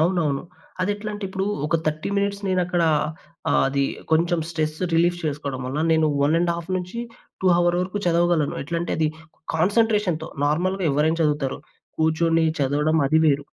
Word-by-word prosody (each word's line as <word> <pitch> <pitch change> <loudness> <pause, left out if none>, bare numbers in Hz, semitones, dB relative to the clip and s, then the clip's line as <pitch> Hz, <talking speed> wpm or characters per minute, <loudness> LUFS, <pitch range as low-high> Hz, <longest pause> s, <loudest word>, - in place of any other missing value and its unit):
అవునవును. 160 -5 +1 0.4
అదెట్లంటిప్పుడూ 205 -1 -3 0.2
ఒక 160 - +2
30 155 0 -1
మినిట్స్ 200 0 -1
నేనక్కడా 180 -2 +1 0.6
ఆహ్, - - +3
అదీ 140 0 +1 0.3
కొంచెం 170 +2 +2
స్ట్రెస్ 155 -2 -2 0.2
రిలీఫ్ 175 +1 +3
చేసుకోడం 140 -3 -3
వల్ల 135 +4 -3
నేను 160 -1 +3 0.2
1:30-2 180 +7 -2
హవర్ 175 0 +2
వరకు 185 +3 -2
చదవగలను. 170 -3 +2
ఎట్లంటే, 170 +4 -3
అది 155 -1 +2 0.5
కాన్సన్‌ట్రేషన్‌తో. 200 -2 +1 0.2
నార్మల్‌గా 180 +6 0
ఎవ్వరైనా 155 +4 +1
చదువుతారు. 150 -3 0 0.4
కూర్చొని 160 +1 +2 0.2
చదవడం, 150 +3 +1
అది 155 +3 +3
వేరు. 145 -2 +2
165 Hz, 125 wpm, -23 LUFS, 155-185 Hz, 0.6 s, ఆహ్